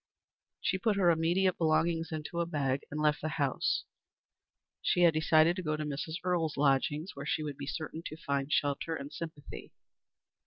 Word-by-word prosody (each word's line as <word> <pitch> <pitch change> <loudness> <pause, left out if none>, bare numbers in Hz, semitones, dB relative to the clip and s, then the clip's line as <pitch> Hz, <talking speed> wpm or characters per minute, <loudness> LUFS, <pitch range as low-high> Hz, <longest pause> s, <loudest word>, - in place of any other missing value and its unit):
She 190 - 0
put 215 0 +2
her 180 -3 +4
immediate 175 +3 +2
belongings 165 +1 +1
into 155 +2 -4
a 170 - 0
bag 140 -4 0
and 150 - -4
left 150 -1 +2
the 155 - -2
house. 140 -4 0 1.0
She 180 - +2
had 170 -2 +6
decided 155 +2 +4
to - - -2
go 155 -3 -1
to 150 - -3
Mrs. 150 +2 -4
Earle's 170 -5 0
lodgings 145 +4 +1
where 140 +1 -6
she 155 - 0
would 145 -2 -4
be 140 - -7
certain 160 +2 -4
to 155 - -8
find 140 -2 -2
shelter 145 +3 0
and 140 -1 -7
sympathy. 160 -3 -8
155 Hz, 180 wpm, -31 LUFS, 145-170 Hz, 1.0 s, had